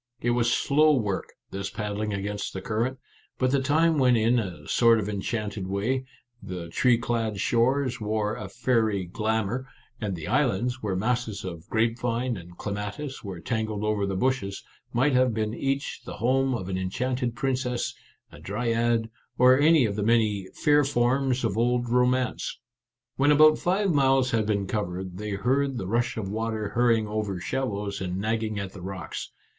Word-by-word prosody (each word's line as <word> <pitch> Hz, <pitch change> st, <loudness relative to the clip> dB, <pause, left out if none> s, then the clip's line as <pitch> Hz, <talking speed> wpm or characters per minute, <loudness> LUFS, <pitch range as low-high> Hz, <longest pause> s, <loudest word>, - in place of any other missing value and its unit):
It 120 Hz, -, 0 dB
was 120 Hz, 0 st, +2 dB
slow 150 Hz, +4 st, +4 dB
work, 105 Hz, -7 st, -2 dB, 0.2 s
this 100 Hz, 0 st, -4 dB
paddling 105 Hz, 0 st, -3 dB
against 100 Hz, 0 st, -3 dB
the 95 Hz, -, -5 dB
current, 115 Hz, +6 st, -1 dB, 0.4 s
but 130 Hz, -1 st, +1 dB
the 140 Hz, -1 st, +2 dB
time 155 Hz, +3 st, +3 dB
went 125 Hz, -2 st, +5 dB
in 115 Hz, +2 st, +3 dB
a 85 Hz, -8 st, -6 dB
sort 115 Hz, -1 st, +4 dB
of 105 Hz, -, -3 dB
en 100 Hz, -2 st, -3 dB
chanted 105 Hz, -3 st, -3 dB
way; 115 Hz, +7 st, -1 dB, 0.4 s
the 90 Hz, -2 st, -6 dB
tree 120 Hz, +7 st, +3 dB
clad 115 Hz, -3 st, -2 dB
shores 125 Hz, +3 st, +1 dB
wore 105 Hz, 0 st, -1 dB
a 95 Hz, -, -7 dB
fairy 110 Hz, -4 st, +1 dB
glamour, 110 Hz, +6 st, -1 dB, 0.3 s
and 100 Hz, -4 st, -2 dB
the 80 Hz, -2 st, -7 dB
islands, 125 Hz, 0 st, +1 dB
where 100 Hz, -3 st, -1 dB
masses 110 Hz, 0 st, -1 dB
of 85 Hz, +1 st, -7 dB
grape 115 Hz, +1 st, +1 dB
vine 120 Hz, +1 st, -1 dB
and 90 Hz, -2 st, -11 dB
clematis 105 Hz, +8 st, -5 dB
were 95 Hz, -4 st, -6 dB
tangled 110 Hz, +1 st, -2 dB
over 105 Hz, -2 st, 0 dB
the 95 Hz, -, -2 dB
bushes, 125 Hz, -3 st, -1 dB, 0.3 s
might 135 Hz, +4 st, +2 dB
have 125 Hz, -2 st, +3 dB
been 110 Hz, -1 st, -1 dB
each 135 Hz, +3 st, -2 dB
the -, -, -8 dB
home 130 Hz, +2 st, +2 dB
of 95 Hz, -6 st, -5 dB
an 95 Hz, -1 st, -2 dB
enchanted 125 Hz, +6 st, -2 dB
princess, 125 Hz, -1 st, -1 dB, 0.4 s
a -, -, -13 dB
dryad, 115 Hz, +2 st, 0 dB, 0.3 s
or 130 Hz, +1 st, +6 dB
any 155 Hz, -2 st, +5 dB
of 100 Hz, -2 st, -2 dB
the 105 Hz, -, -2 dB
many 105 Hz, -3 st, +2 dB
" -, -, -35 dB
fair 150 Hz, -1 st, +6 dB
forms 130 Hz, 0 st, +1 dB
of 110 Hz, -4 st, 0 dB
old 120 Hz, +1 st, +1 dB
romance." 125 Hz, +1 st, +1 dB, 0.6 s
When 145 Hz, +2 st, +4 dB
about 155 Hz, +1 st, +6 dB
five 190 Hz, +2 st, +1 dB
miles 135 Hz, -3 st, +3 dB
had 110 Hz, -2 st, +1 dB
been 100 Hz, -2 st, 0 dB
covered, 95 Hz, -2 st, -4 dB
they 105 Hz, -1 st, -3 dB
heard 130 Hz, +6 st, +1 dB
the 95 Hz, -, -3 dB
rush 115 Hz, +5 st, 0 dB
of 105 Hz, -3 st, -3 dB
water 110 Hz, 0 st, -2 dB
hurrying 115 Hz, 0 st, +2 dB
over 105 Hz, -3 st, -2 dB
shallows 105 Hz, -3 st, -3 dB
and 90 Hz, -1 st, -3 dB
nagging 110 Hz, +1 st, -1 dB
at 100 Hz, -2 st, -4 dB
the 95 Hz, -, -10 dB
rocks. 95 Hz, -2 st, -6 dB
115 Hz, 175 wpm, -26 LUFS, 100-125 Hz, 0.6 s, or